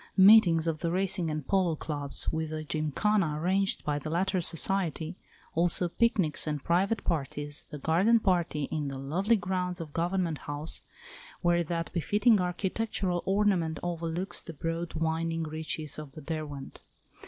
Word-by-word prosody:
Meetings 190 -5 +7
of 160 -2 -1
the 170 - -1
Racing 185 -1 0
and 150 -3 -4
Polo 185 -4 +2
Clubs, 145 -2 -3
with 160 0 -2
a 155 0 -3
gymkhana 155 +2 0
arranged 190 +4 +1
by 145 -1 0
the 155 - -5
latter 185 +3 +1
society, 170 -1 -1 0.4
also 175 +1 +2
picnics 185 -7 +1
and 150 -2 -2
private 195 +5 +1
parties, 145 -2 -2
the 150 - -6
Garden 180 +11 +3
Party 175 -7 +1
in 150 -2 -1
the 135 -1 -4
lovely 175 +12 +1
grounds 180 -2 -2
of 160 -3 -7
Government 170 -2 0
House, 145 +2 -4 0.6
where 175 -1 +3
that 165 0 -3
befitting 205 +5 +3
architectural 180 0 -1
ornament 190 -5 +2
overlooks 175 +1 -3
the 165 - -8
broad 165 +2 -3
winding 165 +1 -1
reaches 155 -1 -3
of 150 -3 -9
the 155 - -9
Derwent. 150 -2 -6
165 Hz, 150 wpm, -29 LUFS, 155-185 Hz, 0.6 s, Meetings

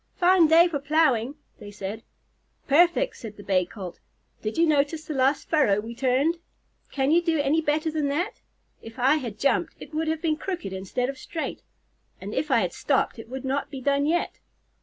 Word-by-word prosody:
"Fine 360 -2 +5
day 330 +3 +6
for 310 -5 -3
plowing," 280 -4 +2 0.2
they 205 - -9
said. 205 +2 -6 0.7
"Perfect," 345 - +4
answered 215 -3 -10
the 205 - -11
Bay 185 -3 +1
Colt. 185 -4 -8 0.4
"Did 215 +5 -4
you 335 - +5
notice 310 +1 +1
the 310 - -4
last 270 +1 +1
furrow 270 -11 +3
we 225 +3 -6
turned? 270 +7 +1 0.5
Can 270 0 +1
you 340 +2 +5
do 330 -3 0
any 290 +3 +2
better 310 +1 0
than 305 -2 -1
that? 340 +9 -2 0.4
If 225 +1 -11
I 265 +5 +4
had 235 -8 -6
jumped, 275 +5 +1
it - - -11
would 315 +1 -1
have 320 0 0
been 315 -2 0
crooked 350 - -5
instead 195 +7 -2
of 270 0 -6
straight; 325 - -5 0.6
and 200 +3 -7
if 305 - -1
I 245 -4 +4
had 180 -3 -2
stopped, 270 -4 0
it 225 - -10
would 265 +1 -6
not 275 +2 -1
be 275 -2 -7
done 280 +2 +1
yet." 345 +2 -1
280 Hz, 200 wpm, -25 LUFS, 235-320 Hz, 0.7 s, day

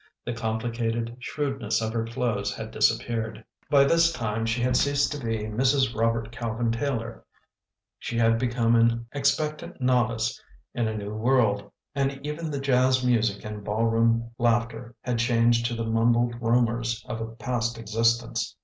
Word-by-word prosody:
The 120 - -2
complicated 115 +1 -2
shrewdness 135 -4 -2
of 110 0 -2
her 115 -1 0
clothes 115 -3 -1
had - - -7
disappeared. 110 -2 0 0.2
By 140 -2 +6
this 165 +3 +4
time 115 -5 -2
she 115 +2 0
had 125 0 +2
ceased 140 +2 +2
to 145 -3 -5
be 115 -2 -2
Mrs. 130 +4 +1
Robert 115 0 0
Cal 115 -2 -4
vin 115 -1 +1
Taylor 115 -2 -3 0.4
— - - -63
she 115 - -4
had 115 0 +3
become 120 -1 +2
an 115 0 +3
expectant 145 +2 -1
novice 120 -3 +1 0.3
in 120 -2 0
a 110 0 -3
new 105 0 -5
world, 110 -2 +1 0.2
and 135 -1 -1
even 155 +2 -4
the 145 -2 -3
jazz 130 -1 +2
music 115 -5 +1
and 105 -1 -6
ballroom 115 +2 +1
laughter 120 0 0
had 120 -2 -1
changed 115 0 +3
to 120 - -3
the 115 0 -3
mumbled 120 +1 +2
rumours 115 -1 +1
of 115 - -4
a 115 - -3
past 120 -1 -2
existence. 115 +1 0
115 Hz, 160 wpm, -26 LUFS, 115-125 Hz, 0.4 s, By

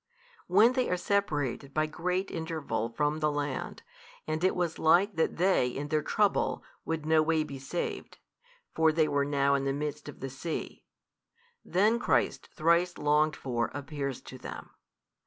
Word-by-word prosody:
When 210 +7 +5
they 255 -1 0
are 180 - +1
separated 145 -9 -1
by 155 0 +3
great 180 +5 -2
interval 155 -9 -3
from 150 +5 0
the 150 -1 +1
land, 145 -1 -3 0.4
and 155 +2 -2
it 185 - +3
was 175 -3 -1
like 180 +6 +4
that 160 - 0
they 180 -7 +3
in 140 +4 -4
their 155 0 +1
trouble 205 +5 +1 0.2
would 160 -2 -2
no 160 0 +4
way 160 0 +2
be 140 -3 -8
saved 135 +6 -4 0.6
(for 160 -1 +4
they 155 0 +2
were 145 -1 +1
now 140 -1 +2
in 140 -1 +1
the 135 - +1
midst 150 +1 -4
of 145 - -11
the 135 0 -5
sea) 155 +5 -5 0.8
then 215 +6 +2
Christ - - +1
thrice 170 +2 +2
longed 150 +1 +2
for 120 -3 -2
appears 140 -2 -4
to 130 - -11
them. - - -8
155 Hz, 165 wpm, -29 LUFS, 140-175 Hz, 0.8 s, When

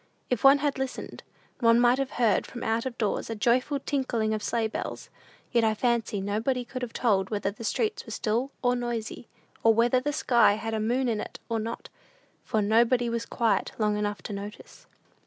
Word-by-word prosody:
If 250 - 0
one 275 +1 +8
had 285 -1 -1
listened, 265 -1 -5 0.4
one 230 -1 +5
might 245 +2 +4
have 270 -1 -1
heard, 230 -5 +2
from 240 - -7
out 225 +3 0
of 245 -2 -7
doors, 215 0 -1
a 225 - -3
joyful 250 +6 +1
tinkling 240 -6 -1
of 215 - -2
sleigh 230 +1 0
bells; 220 - -6 0.4
yet 235 -2 +3
I 220 -1 +2
fancy 235 -2 0
nobody 225 +6 -1
could 255 0 -6
have 245 -2 -4
told 195 -6 +1
whether 205 -2 -1
the 215 - -10
streets 430 - -1
were - - -10
still 235 +4 -1
or 245 0 +3
noisy, 240 -2 -4 0.3
or 225 -1 +5
whether 240 +3 +3
the 290 +3 -2
sky 240 -7 +4
had 225 +1 -4
a 220 - 0
moon 245 +4 0
in 220 -3 0
it - - -8
or 230 -1 0
not; 230 +2 -5 0.5
for 215 -1 0
nobody 235 +3 +3
was 230 0 -3
quiet 230 -2 0
long 210 -1 +1
enough 205 -3 -2
to 210 - -5
notice. 205 +1 -9
230 Hz, 200 wpm, -27 LUFS, 215-250 Hz, 0.5 s, one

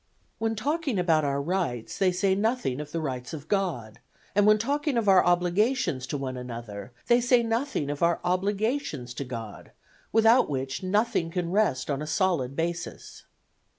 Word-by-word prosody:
When 225 0 0
talking 285 +1 -1
about 165 -4 +3
our 140 -1 0
rights 140 - -2
they 190 -2 +4
say 190 +2 +1
nothing 205 - 0
of 150 0 -9
the 165 - -2
rights 130 -4 -4
of 150 0 -10
God, 165 - -2 0.3
and 205 +1 +4
when 215 0 +6
talking 285 +4 -1
of 225 -3 0
our 190 -2 +6
obligations 175 - +1
to 145 - -3
one 130 -2 -4
another 120 -4 -7
they 240 0 +4
say 245 0 +4
nothing 230 - -1
of 145 - -6
our 170 0 +3
obligations 195 - -1
to 130 - -4
God, 115 -5 -8 0.4
without 225 +1 +5
which 135 -1 -3
nothing 190 -2 +1
can 170 0 -2
rest 180 -10 +1
on 140 0 -2
a 150 - -4
solid 155 -6 0
basis. 170 +2 -4
175 Hz, 170 wpm, -27 LUFS, 140-215 Hz, 0.4 s, when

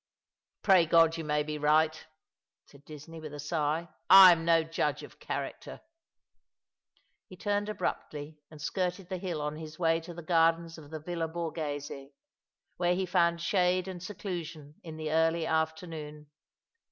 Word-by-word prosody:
" - - -63
Pray 185 -5 +5
God 165 0 +5
you 165 - -5
may 150 -1 0
be 150 0 -5
right," 155 +1 +2 0.6
said 140 0 -19
Disney, 155 +2 -10
with 150 -2 -8
a - - -8
sigh. 155 +2 -1
" - - -48
I 190 0 +11
am 165 -1 +1
no 165 -1 +4
judge 150 -2 -2
of - - -13
character." - - -6 1.5
He 185 - -13
turned 205 +2 -1
abruptly, 150 -7 -4
and 155 - -13
skirted 180 +3 -3
the 185 -2 -3
hill 175 -5 -3
on 150 +1 -3
his 155 -1 -9
way 165 -1 +2
to 170 +1 -10
the 170 - -8
gardens 165 0 +2
of 145 -2 -13
the 155 0 -6
Villa 165 +1 -3
Borgbese, 150 -4 -5 0.7
where 175 0 +2
he 190 +1 -1
found 170 -2 +2
shade 180 0 +1
and 185 -2 -7
seclusion 170 -6 -6
in 160 -2 -9
the 155 -1 -4
early 165 +1 +2
afternoon. 160 -2 -3
165 Hz, 165 wpm, -30 LUFS, 155-175 Hz, 1.5 s, I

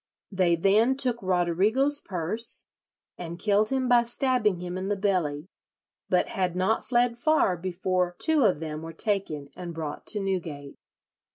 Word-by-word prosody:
They 185 -3 +2
then 215 +9 +3
took 250 -4 +1
Roderigo's 195 - +1
purse, 190 +6 -2 0.5
and 170 -1 -6
killed 210 +3 +1
him 265 -1 0
by 245 -1 +5
stabbing 235 -5 0
him 180 0 -6
in 185 +1 -4
the 205 - 0
belly, 180 -7 -1 0.6
but - - +1
had 185 -2 -2
not 190 +5 0
fled 240 -1 +1
far 310 - +2
before 180 0 -2
two 315 - +4
of 185 -9 +2
them 155 -1 -5
were 165 0 -8
taken 165 -8 -1
and 175 -2 -7
brought 155 -2 -6
to 210 - +4
Newgate." 165 -8 -4
190 Hz, 155 wpm, -26 LUFS, 170-230 Hz, 0.6 s, by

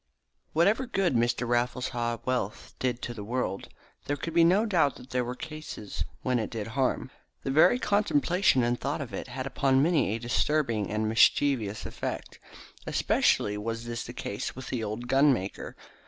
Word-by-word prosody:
Whatever 205 +11 +3
good 195 - +1
Mr. 120 +1 +1
Raffles 120 +1 0
Haw's 120 -2 -2
wealth 125 -5 -2
did 125 -1 -1
to 120 - -3
the 105 -3 -7
world, 110 -3 -3 0.4
there 145 - -1
could 165 +3 -5
be 170 0 +5
no 190 +6 +4
doubt 170 - +2
that 125 - -13
there 125 0 +1
were 125 +1 -4
cases 155 -9 -6 0.2
where 125 -1 +1
it 110 - -2
did 110 -3 -4
harm. 130 +1 -1 0.3
The 135 - -1
very 155 - +6
contemplation 200 - +2
and 120 +1 0
thought 140 - -2
of 140 -5 -6
it - - -5
had 130 +1 -5
upon 135 0 +2
many 155 - +2
a - - -4
disturbing 120 -3 0
and 110 +1 -1
mischievous 115 -1 +3
effect. - - -5 0.5
Especially 105 0 +2
was 115 +2 -4
this 120 0 -4
the - - -8
case 105 -4 -5
with 130 0 -8
the 120 -3 -2
old 110 +3 -4
gunmaker. 135 -7 +1
125 Hz, 175 wpm, -28 LUFS, 115-150 Hz, 0.5 s, very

